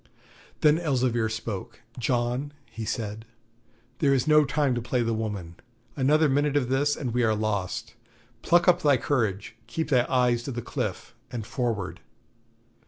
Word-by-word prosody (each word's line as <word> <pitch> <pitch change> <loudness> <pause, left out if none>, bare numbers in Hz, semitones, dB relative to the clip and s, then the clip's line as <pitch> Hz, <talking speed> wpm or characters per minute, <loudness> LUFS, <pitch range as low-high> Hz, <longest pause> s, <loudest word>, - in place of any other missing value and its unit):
Then 150 +1 +5
Elzevir 125 -8 +1
spoke. 110 -3 -6 0.2
'John' 125 +4 -1
he 115 - -7
said, 110 -1 -4 0.8
'there 140 -3 +4
is 130 - 0
no 150 -1 +6
time 140 -1 +1
to 120 - -2
play 120 +1 0
the 115 0 0
woman; 105 -6 -4 0.4
another 150 +3 +3
minute 145 +1 +2
of 125 -4 0
this 145 +2 +2
and 125 -6 -4
we 125 - +1
are 110 -2 +3
lost. 105 -4 -2 0.5
Pluck 175 +1 +3
up 180 0 +5
thy 145 -4 +4
courage, 110 -6 -1
keep 160 +7 -3
thy 125 -4 +3
eyes 125 -2 +2
to 135 - -5
the 120 -2 -5
cliff, - - -4 0.2
and 115 -4 -4
forward.' 115 -6 -2
125 Hz, 160 wpm, -26 LUFS, 110-145 Hz, 0.8 s, no